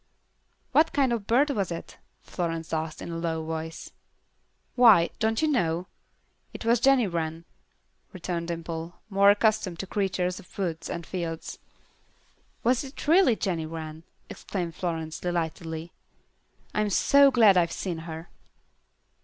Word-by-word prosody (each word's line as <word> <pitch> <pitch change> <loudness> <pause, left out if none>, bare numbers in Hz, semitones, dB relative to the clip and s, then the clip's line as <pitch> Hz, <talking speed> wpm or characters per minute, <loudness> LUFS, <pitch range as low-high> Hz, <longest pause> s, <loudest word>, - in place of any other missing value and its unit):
"What 320 +1 +4
kind 270 -4 +2
of 220 -4 -3
bird 275 +6 +3
was 200 -9 -1
it?" 170 - -7 0.2
Florence 165 -2 -4
asked, 160 0 -3
in - - -6
a 165 - -4
low 160 -1 -2
voice. 160 0 -5 0.8
"Why, 225 -9 +6
don't 225 +4 +1
you - - +4
know? 175 - +1 0.7
That - - -8
was 235 +1 +4
Jenny 265 -1 +4
Wren," 165 -2 -3 0.7
returned 175 -2 -4
Dimple, 165 0 -5 0.2
more 200 +1 +5
accustomed 210 -3 +2
to 195 - -4
creatures 190 -2 -1
of - - -17
woods 170 -5 -3
and 170 -1 -5
fields. 165 -3 -5 1.0
"Was 245 +3 +2
it 275 +2 -9
really 330 -6 +5
Jenny 170 -7 -2
Wren?" 160 -1 -7 0.3
exclaimed 175 -4 -5
Florence, 160 -2 -4
delightedly. 165 -1 -3 0.8
"I'm 210 0 +1
so 280 +8 +5
glad 225 -7 +6
I've 170 -2 +3
seen 175 -4 -4
her." 160 +1 -7
175 Hz, 135 wpm, -27 LUFS, 165-220 Hz, 1.0 s, Why